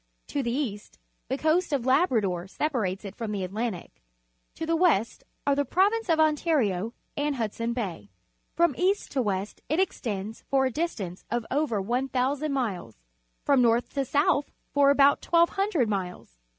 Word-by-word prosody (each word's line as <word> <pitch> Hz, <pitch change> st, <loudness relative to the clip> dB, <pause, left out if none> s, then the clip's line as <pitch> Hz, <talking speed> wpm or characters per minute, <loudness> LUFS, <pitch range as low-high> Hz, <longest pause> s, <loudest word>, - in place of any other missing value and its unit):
To 285 Hz, -, -1 dB
the 240 Hz, -, -2 dB
east 235 Hz, -6 st, -4 dB, 0.3 s
the 265 Hz, -, -1 dB
Coast 320 Hz, +3 st, +1 dB
of 270 Hz, -4 st, 0 dB
Labrador 225 Hz, -, +2 dB
separates 210 Hz, -6 st, -2 dB
it 195 Hz, -, -6 dB
from 225 Hz, -2 st, -4 dB
the 200 Hz, -2 st, -2 dB
Atlantic; 205 Hz, 0 st, -4 dB, 0.5 s
to 325 Hz, -, -4 dB
the 330 Hz, +1 st, +1 dB
west 320 Hz, -, +2 dB, 0.2 s
are 285 Hz, -, +3 dB
the 285 Hz, -, +2 dB
Prolan 400 Hz, +9 st, +2 dB
ce 370 Hz, -, -19 dB
of 325 Hz, -1 st, +3 dB
Ontario 275 Hz, -, +1 dB, 0.2 s
and 290 Hz, 0 st, -1 dB
Hudson 230 Hz, 0 st, -2 dB
Bay. 185 Hz, -, -4 dB, 0.5 s
From 340 Hz, -3 st, +3 dB
east 385 Hz, +3 st, +1 dB
to 270 Hz, -, +1 dB
west 200 Hz, -2 st, -3 dB
it 310 Hz, -, +1 dB
extends 220 Hz, -, -2 dB
for 270 Hz, -1 st, +3 dB
a 260 Hz, -, 0 dB
distance 220 Hz, -, -3 dB
of 235 Hz, 0 st, -1 dB
over 275 Hz, -6 st, +1 dB
1,000 260 Hz, +6 st, -1 dB
miles, 200 Hz, -, -3 dB, 0.5 s
from 275 Hz, -3 st, +4 dB
north 235 Hz, 0 st, +2 dB
to 275 Hz, -, 0 dB
south 285 Hz, +1 st, +1 dB, 0.2 s
for 285 Hz, -1 st, +5 dB
about 280 Hz, 0 st, +4 dB
1,200 340 Hz, -, +2 dB
iniles. 180 Hz, -, -4 dB
260 Hz, 165 wpm, -27 LUFS, 210-300 Hz, 0.5 s, for